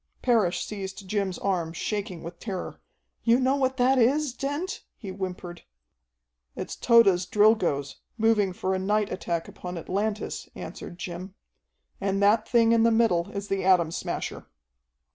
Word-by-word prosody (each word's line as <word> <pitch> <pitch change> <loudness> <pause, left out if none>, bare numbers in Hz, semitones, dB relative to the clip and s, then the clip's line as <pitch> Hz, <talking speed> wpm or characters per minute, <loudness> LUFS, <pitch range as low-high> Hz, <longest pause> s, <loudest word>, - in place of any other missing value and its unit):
Parrish 220 -8 +2
seized 195 -1 -7
Jim's 195 -2 -1
arm, 175 -4 -1
shaking 195 -1 -4
with 170 +1 -8
terror. 190 -5 -5 0.4
"You 235 +1 +4
know 260 +1 +2
what 265 -1 0
that 260 +1 +4
is, 275 +3 +2
Dent?" 290 +8 -3 0.2
he 205 - -8
whimpered. 180 -2 -6 0.9
"It's - - -5
Tode's 200 -7 +4
Drilgoes, 185 -11 +2 0.2
moving 220 -3 +3
for 185 +1 -2
a 190 - 0
night 205 +2 0
attack 170 -3 -3
upon 180 -1 -7
Atlantis," 205 +5 -3
answered 175 - -8
Jim. 180 +2 -7 0.7
"And 195 0 0
that 210 +2 +3
thing 230 -2 +4
in 230 -1 +4
the 230 - +5
middle 220 -6 +2
is 200 -1 -5
the 195 -1 -1
Atom 180 -4 +4
Smasher." - - -4
200 Hz, 145 wpm, -26 LUFS, 180-230 Hz, 0.9 s, the